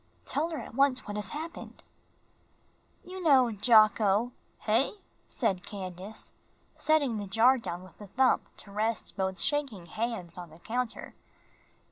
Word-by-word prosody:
"Tell 315 Hz, +4 st, -1 dB
her 320 Hz, -, -4 dB
at -, -, -8 dB
once 270 Hz, 0 st, +2 dB
what 205 Hz, -, -5 dB
has 210 Hz, -1 st, -1 dB
happened." 320 Hz, +3 st, -7 dB, 1.2 s
"You 370 Hz, +1 st, -7 dB
know 265 Hz, -7 st, +5 dB
Jocko 215 Hz, +1 st, +4 dB
" -, -, -38 dB
"Hey?" 230 Hz, +5 st, +2 dB, 0.3 s
said 195 Hz, -7 st, -1 dB
Candace, 190 Hz, +1 st, -8 dB, 0.4 s
setting 285 Hz, -7 st, +2 dB
the 205 Hz, -, -5 dB
jar 235 Hz, +6 st, +4 dB
down 175 Hz, -5 st, -5 dB
with 185 Hz, -, -16 dB
a 205 Hz, -, -9 dB
thump 255 Hz, +6 st, +3 dB, 0.2 s
to 200 Hz, -, -10 dB
rest 215 Hz, +2 st, -2 dB
both 190 Hz, -2 st, -2 dB
shaking 275 Hz, -, 0 dB
hands 185 Hz, -3 st, -4 dB
on 175 Hz, -1 st, -8 dB
the 155 Hz, -, -15 dB
counter. 240 Hz, +6 st, -4 dB
220 Hz, 145 wpm, -29 LUFS, 195-260 Hz, 1.2 s, know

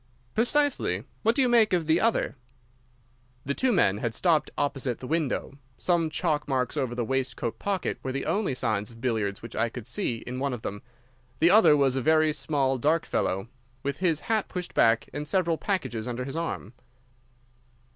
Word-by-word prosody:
"Precisely. 285 Hz, +5 st, +1 dB, 0.2 s
What 225 Hz, +1 st, +2 dB
do 275 Hz, -, +4 dB
you -, -, +3 dB
make 230 Hz, -4 st, +4 dB
of 175 Hz, -3 st, +2 dB
the 160 Hz, +2 st, +3 dB
other?" 225 Hz, -8 st, +1 dB, 1.1 s
The 140 Hz, -, 0 dB
two 260 Hz, -, +1 dB
men 105 Hz, -, +3 dB
had 115 Hz, -1 st, -2 dB
stopped 165 Hz, -4 st, +2 dB
opposite 135 Hz, -4 st, -1 dB
the -, -, -8 dB
window. 145 Hz, -2 st, -2 dB, 0.2 s
Some 170 Hz, -3 st, +1 dB
chalk 155 Hz, -2 st, -1 dB
marks 130 Hz, -2 st, -1 dB
over 130 Hz, -5 st, -1 dB
the 120 Hz, -1 st, -1 dB
waistcoat 130 Hz, -2 st, -2 dB
pocket 200 Hz, -2 st, -2 dB
were 130 Hz, -, -3 dB
the 135 Hz, +1 st, -3 dB
only 195 Hz, -10 st, 0 dB
signs 105 Hz, -4 st, -1 dB
of 115 Hz, -1 st, -14 dB
billiards 110 Hz, -5 st, -1 dB
which 115 Hz, -, -8 dB
I 115 Hz, +1 st, +1 dB
could 115 Hz, -1 st, -8 dB
see 115 Hz, -1 st, -2 dB
in 125 Hz, +1 st, -5 dB
one 140 Hz, -1 st, -1 dB
of 120 Hz, -, -6 dB
them. 100 Hz, +1 st, -5 dB, 0.6 s
The 170 Hz, +3 st, +5 dB
other 205 Hz, -8 st, +7 dB
was 135 Hz, -2 st, +2 dB
a 135 Hz, -, 0 dB
very 155 Hz, +2 st, +3 dB
small, 135 Hz, -4 st, 0 dB
dark 155 Hz, +6 st, +2 dB
fellow, 95 Hz, +3 st, -1 dB, 0.4 s
with 140 Hz, 0 st, -2 dB
his 165 Hz, -3 st, +1 dB
hat 220 Hz, -2 st, 0 dB
pushed 180 Hz, -1 st, -5 dB
back 115 Hz, 0 st, +3 dB
and 150 Hz, +1 st, -4 dB
several 170 Hz, -1 st, +1 dB
packages 125 Hz, -, -2 dB
under 125 Hz, +1 st, -3 dB
his 135 Hz, +2 st, -6 dB
arm. 165 Hz, -, -4 dB
140 Hz, 185 wpm, -27 LUFS, 120-170 Hz, 1.1 s, other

